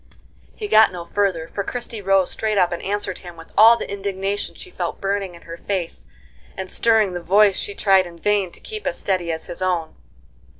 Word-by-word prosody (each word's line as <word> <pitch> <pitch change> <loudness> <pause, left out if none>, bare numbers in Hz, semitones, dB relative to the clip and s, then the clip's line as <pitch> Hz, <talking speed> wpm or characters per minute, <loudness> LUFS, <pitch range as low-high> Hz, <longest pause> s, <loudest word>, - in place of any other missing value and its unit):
He 420 - -5
got 220 - +6
no 175 -2 -7
further, 180 -3 0
for 200 - -4
Christie 235 0 -5
rose 195 -1 +2
straight 215 -1 -1
up 180 -2 +3
and 175 - -4
answered 200 -1 -3
him 175 -2 -11
with 165 - -14
all 225 +2 +8
the - - -5
indignation 200 0 -3
she 370 - -10
felt - - -4
burning 195 -2 -2
in 170 - -15
her 165 0 -8
face 170 - -4 0.5
and 190 -1 -5
stirring 220 -4 +3
the 175 - -4
voice 200 +3 +4
she 205 - -3
tried 190 -2 +4
in 170 -1 -12
vain 200 +1 +1
to - - -14
keep 430 -1 -6
as - - -2
steady 180 -3 -1
as 160 0 -5
his 180 - -8
own. 180 -3 -1
195 Hz, 210 wpm, -21 LUFS, 175-205 Hz, 0.5 s, all